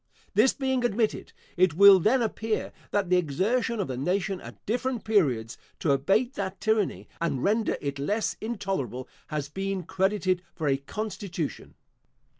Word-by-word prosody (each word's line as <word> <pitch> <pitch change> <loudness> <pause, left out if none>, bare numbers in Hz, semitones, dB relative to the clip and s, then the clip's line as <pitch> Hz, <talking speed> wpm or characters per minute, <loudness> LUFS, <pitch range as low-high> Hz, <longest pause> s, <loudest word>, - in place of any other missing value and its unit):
This 220 +6 +5
being 265 -2 -1
admitted, 230 -2 0 0.3
it 180 -3 +4
will 200 +1 +9
then 235 +7 +3
appear, 220 0 -2 0.2
that 200 -3 0
the 180 - +6
exertion 205 - 0
of 195 - -1
the 130 - -4
nation, 185 +6 -1
at - - -12
different 245 +2 -1
periods, 135 - +1 0.2
to 155 - +1
abate 195 - +2
that 195 -1 -4
tyranny, 220 -3 0
and 140 -7 -1
render 215 +2 +1
it 140 -1 -4
less 205 +10 0
intolerable, 190 - -3 0.2
has 150 -2 -3
been 195 +4 -3
credited 185 0 0
for 160 -4 -2
a 135 -1 +3
constitution. 180 0 -5
195 Hz, 150 wpm, -27 LUFS, 160-220 Hz, 0.3 s, will